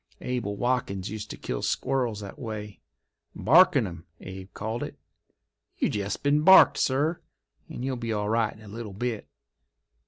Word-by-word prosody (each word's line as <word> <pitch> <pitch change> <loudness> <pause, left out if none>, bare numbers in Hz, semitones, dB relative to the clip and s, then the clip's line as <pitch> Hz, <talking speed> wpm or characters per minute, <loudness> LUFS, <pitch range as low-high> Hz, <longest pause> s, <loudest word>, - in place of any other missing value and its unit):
Abel 120 -5 -3
Wadkins 100 -7 -1
used 110 -1 -6
to - - -7
kill - - -4
squirrels 125 -5 -1
that 100 - -9
way—barkin' 115 - +1
'em, 85 -2 -8
Abe 95 +1 -9
called 110 +3 -4
it. - - -6 0.8
You - - +1
jest 100 -1 -3
been 145 +1 +3
barked, 190 +4 +7
sir, 145 +6 +1 0.5
and 125 - -5
you'll 130 -1 -2
be 115 -1 -4
all 105 -1 -1
right 110 0 +1
in 110 - -16
a - - -12
little 110 0 -7
bit. 115 +1 -3
110 Hz, 155 wpm, -27 LUFS, 100-125 Hz, 0.8 s, barked